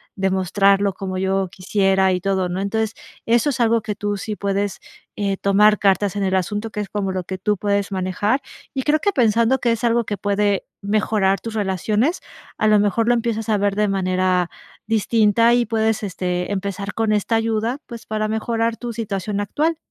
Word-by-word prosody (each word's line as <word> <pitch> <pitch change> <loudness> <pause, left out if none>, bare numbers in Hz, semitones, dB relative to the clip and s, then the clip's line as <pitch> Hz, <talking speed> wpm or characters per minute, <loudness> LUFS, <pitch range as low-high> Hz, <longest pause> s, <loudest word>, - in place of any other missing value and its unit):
demostrarlo 195 +1 +2
como 185 -1 -5
yo 190 0 0
quisiera, 190 0 +1
y 180 - -2
todo, 190 -2 0
¿no? 185 +2 -2
Entonces, 220 +2 -1 0.3
eso 235 +5 +3
es 265 - -5
algo 230 0 +3
que 210 -1 -4
tú 205 0 -2
sí 210 +2 -4
puedes, 200 0 -2 0.4
eh, 200 -2 -1
tomar 210 +1 +4
cartas 200 0 +2
en 200 - 0
el 190 0 +1
asunto, 205 +4 -1
que - - -5
es 205 - -6
como 195 -2 -2
lo 185 -1 -2
que 190 +1 -5
tú 210 +1 0
puedes 200 0 -1
manejar, 195 +7 0 0.3
y 265 -2 -2
creo 305 +1 +2
que 405 - +1
pensando 235 0 +3
que 240 -1 +1
es 230 - -5
algo 235 0 +2
que 205 - -3
puede 205 0 0 0.2
mejorar 200 -1 +1
tus 230 - -6
relaciones, 210 - 0 0.4
a 215 - +2
lo 210 -1 +5
mejor 210 +3 +1
lo 240 - +5
empiezas 230 -1 -1
a 210 - +3
ver 200 0 0
de 210 0 +2
manera 185 -2 +1 0.4
distinta, 225 +1 +3
y 240 0 +3
puedes, 220 -1 0
este, 180 -2 -2
empezar 200 0 -3
con 220 -1 +1
esta 210 +2 +1
ayuda, 225 +2 0
pues, 235 -2 -9
para 215 0 -2
mejorar 225 +1 -1
tu 240 -1 -5
situación 205 -2 -3
actual. 310 +10 0
205 Hz, 195 wpm, -21 LUFS, 195-225 Hz, 0.4 s, lo